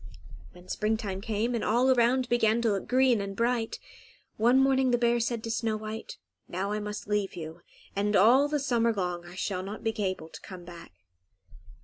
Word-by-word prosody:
When 180 0 -16
springtime 210 -2 -2
came, 225 +2 -1
and 235 - -1
all 245 +4 +3
around 250 +1 +3
began 230 -2 +2
to 225 - +3
look 195 -1 -2
green 255 -3 +3
and 195 0 -5
bright, 235 0 0 0.6
one 240 +4 +4
morning 265 -1 +3
the 245 - +3
bear 240 0 +2
said 230 -1 -2
to 230 - -3
Snow 225 -1 -1
White, 215 +1 -7 0.3
"Now 190 +3 -3
I 210 - -1
must 210 0 -6
leave 210 -2 -1
you, 165 0 -8 0.3
and 205 +1 +1
all 245 +9 +6
the 300 0 0
summer 235 -4 +2
long 180 -3 -3
I 175 - -11
shall 190 -1 -2
not 200 +3 -7
be 225 - 0
able 185 -4 -3
to - - -11
come 180 -2 -10
back." 170 -1 -11
220 Hz, 195 wpm, -28 LUFS, 195-240 Hz, 0.6 s, all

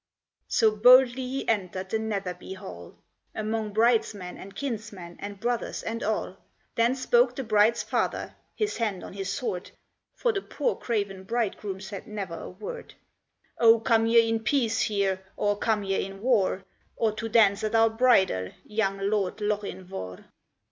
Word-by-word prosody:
So 220 -2 +3
boldly 250 +3 +6
he 270 +2 -4
entered 190 -3 -1
the 220 - +1
Netherby 195 -4 -4
hall, 85 - -10 0.4
'Mong 215 0 -2
bridesmen, 215 -4 +1
and 195 +1 -11
kinsmen, 210 -9 -5
and 200 -1 -7
brothers, 240 +1 -2
and 230 +1 -4
all: 210 -3 -2 0.4
Then 235 +2 +2
spoke 480 - +3
the 270 - -3
bride's 220 +1 +3
father, - - -2 0.2
his 420 -1 -1
hand 210 -6 -2
on - - -9
his 195 -1 -4
sword 195 -6 -3 0.5
(For 475 -2 +1
the 395 - -1
poor, 485 - -1
craven 200 -5 -3
bridegroom 210 -4 -2
said 195 0 -8
never 200 -5 -5
a - - -7
word), 195 +3 -8 0.6
"O, 230 -1 +7
come 225 0 +2
ye 230 0 +5
in 225 0 +1
peace 225 -2 +1
here, 200 -3 0 0.2
or 205 0 +1
come 215 0 0
ye 195 0 0
in 195 +1 -8
war, 205 -6 +2 0.3
Or 225 -1 +1
to 225 +2 -5
dance 210 -3 +4
at 215 +1 0
our 225 0 +5
bridal, 195 - +3 0.2
young 210 -2 -1
Lord 195 0 -1
Lochinvar?" 190 - -4
215 Hz, 155 wpm, -27 LUFS, 195-230 Hz, 0.6 s, O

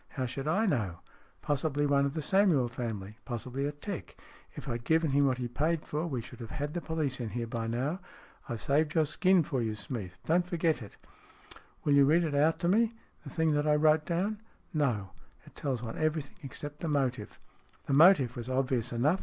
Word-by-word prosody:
" - - -39
How 130 - 0
should 135 +3 -4
I 200 +8 +2
know? 105 - 0 0.4
Possibly 145 0 0
one 140 -1 +3
of 140 - -6
the 155 - -2
Samuel 180 -7 +4
family. 110 -3 -5
Possibly 130 +3 -3
a - - -2
'tec. 170 +6 -7 0.4
If - - -8
I - - -1
had 120 0 -4
given 160 +1 +2
him 140 +1 +4
what 130 -1 +1
he 125 - -4
had 120 0 -5
paid 155 +4 0
for, 155 +3 -2
we 130 -7 -2
should - - -11
have 115 -2 -7
had 145 +1 -4
the 175 - -2
police 155 -6 -2
in 120 -3 -3
here 120 +1 -3
by 115 0 -3
now. 130 +10 -1 0.5
I - - -1
have 115 - -5
saved 150 +3 +1
your 160 -1 +4
skin 180 +4 +3
for 135 -3 -2
you, 110 -2 -1
Smeath. 105 -4 -6
Don't 175 +2 +2
forget 165 -4 +1
it." 105 - -11 0.4
" - - -22
Will 145 - +3
you 140 -1 +7
read 165 +5 +4
it 155 -3 -1
out 150 +3 +3
to 170 - +1
me, 225 +5 +3 0.3
the - - -8
thing 160 -2 +1
that 145 +1 +1
I 150 - +5
wrote 155 +1 +3
down? 195 +5 -1
" - - -34
" - - -35
No. 120 - 0 0.3
It - - -16
tells 130 -5 -3
one 115 - -5
everything, 155 -3 -1
except 145 +1 -7
the 165 - -3
motive." 130 -7 -1 0.2
" - - -33
The - - -1
motive 145 -5 +6
was 120 +1 -6
obvious 130 -3 0
enough. 145 +10 +2
145 Hz, 235 wpm, -30 LUFS, 120-160 Hz, 0.5 s, you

